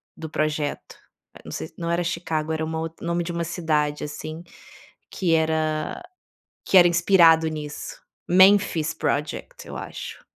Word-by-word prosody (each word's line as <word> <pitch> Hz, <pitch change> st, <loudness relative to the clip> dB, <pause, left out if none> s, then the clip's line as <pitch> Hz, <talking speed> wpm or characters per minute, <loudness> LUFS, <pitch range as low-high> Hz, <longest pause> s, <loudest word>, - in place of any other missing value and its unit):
do 160 Hz, -, -7 dB
projeto. 155 Hz, -1 st, -2 dB, 0.4 s
Eh, -, -, -13 dB
não -, -, -10 dB
sei 80 Hz, -, -4 dB
se -, -, -25 dB
não 170 Hz, -1 st, -4 dB
era 170 Hz, +1 st, +1 dB
Chicago, 165 Hz, -2 st, -2 dB
era 160 Hz, 0 st, -2 dB
uma 160 Hz, 0 st, -3 dB
outr 160 Hz, 0 st, -6 dB
nome 170 Hz, +1 st, -1 dB
de 170 Hz, -, -4 dB
uma 170 Hz, 0 st, -2 dB
cidade, 155 Hz, -3 st, -1 dB
assim, 155 Hz, +2 st, -7 dB, 0.7 s
que 175 Hz, -4 st, 0 dB
era 160 Hz, -, 0 dB, 0.6 s
que -, -, +2 dB
era 175 Hz, -, +8 dB
inspirado 170 Hz, -2 st, +5 dB
nisso. 150 Hz, -1 st, -7 dB, 0.3 s
Memphis 185 Hz, -4 st, +4 dB
Project, 150 Hz, -1 st, -3 dB
eu -, -, -8 dB
acho. -, -, -8 dB
160 Hz, 155 wpm, -24 LUFS, 155-170 Hz, 0.7 s, era